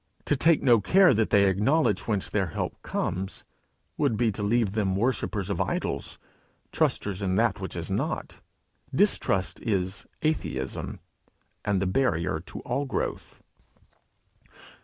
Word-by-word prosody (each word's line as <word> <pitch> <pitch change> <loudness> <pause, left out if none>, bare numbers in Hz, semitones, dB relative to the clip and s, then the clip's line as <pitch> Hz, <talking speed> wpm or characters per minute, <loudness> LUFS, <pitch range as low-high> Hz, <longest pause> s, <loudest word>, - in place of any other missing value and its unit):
To 145 - +2
take 160 +3 +3
no 120 -5 +5
care 185 - +5
that 110 -1 +1
they 100 -1 +5
acknowledge 105 - +2
whence 105 -4 0
their 100 -3 0
help 80 - -4
comes, 95 +1 -3 0.5
would 110 - +2
be 115 0 +2
to 105 - -6
leave 110 0 +1
them 100 -3 0
worshippers 105 -3 -1
of - - -1
idols, - - -2 0.5
trusters 100 -1 0
in 95 -2 0
that - - +1
which - - -5
is - - -4
not. - - -3 0.5
Distrust 95 -1 +2
is 95 -3 -2 0.2
atheism, 65 - -2 0.6
and 100 -2 +1
the 95 - 0
barrier 90 -7 +1
to 85 - -9
all 135 +4 -2
growth. 135 - -4
105 Hz, 135 wpm, -27 LUFS, 95-120 Hz, 0.6 s, no